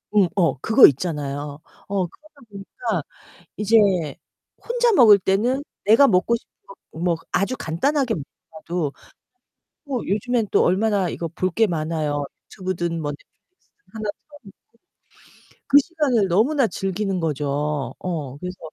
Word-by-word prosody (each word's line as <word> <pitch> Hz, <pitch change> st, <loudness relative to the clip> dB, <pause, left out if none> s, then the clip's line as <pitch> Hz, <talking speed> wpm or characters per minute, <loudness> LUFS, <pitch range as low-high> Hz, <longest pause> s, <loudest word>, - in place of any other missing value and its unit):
음 195 Hz, -4 st, +5 dB
어 170 Hz, -7 st, +2 dB
그거 225 Hz, -, +7 dB
있잖아요. 145 Hz, -1 st, -3 dB, 0.3 s
어 195 Hz, -2 st, -1 dB
그러다 305 Hz, -, -23 dB
보니까 200 Hz, -, -4 dB, 0.5 s
이제 215 Hz, +2 st, +2 dB, 0.9 s
혼자 480 Hz, -1 st, +2 dB
먹을 220 Hz, -, +7 dB
때는 230 Hz, +9 st, +1 dB, 0.2 s
내가 225 Hz, +7 st, +6 dB
먹고 200 Hz, +4 st, +2 dB
싶은 -, -, -15 dB, 0.2 s
거 195 Hz, -, -12 dB, 0.2 s
뭐 170 Hz, +1 st, -1 dB, 0.2 s
아주 200 Hz, +7 st, 0 dB
간단하게 255 Hz, -, 0 dB
먹더라도 160 Hz, +1 st, -6 dB, 0.9 s
뭐 275 Hz, -4 st, -3 dB
요즘엔 220 Hz, +3 st, 0 dB
또 -, -, +4 dB
얼마나 195 Hz, -1 st, +1 dB
이거 165 Hz, -, -4 dB
볼 185 Hz, +2 st, -2 dB
게 225 Hz, +4 st, +2 dB
많아요. 155 Hz, -3 st, -2 dB, 0.2 s
유튜브든 175 Hz, -4 st, -4 dB
뭐 145 Hz, -, -2 dB
넷플릭스든 345 Hz, -, -18 dB, 0.2 s
하나 215 Hz, -2 st, -4 dB, 1.4 s
틀어 -, -, -27 dB
놓고 -, -, -49 dB
그 280 Hz, -, +7 dB
시간을 275 Hz, -, 0 dB
너무나 240 Hz, -, +3 dB
즐기는 195 Hz, 0 st, -2 dB
거죠. 150 Hz, -1 st, -2 dB
어, 155 Hz, -7 st, -4 dB
그래서 180 Hz, +3 st, -7 dB
190 Hz, 280 characters per minute, -22 LUFS, 160-225 Hz, 1.4 s, 그거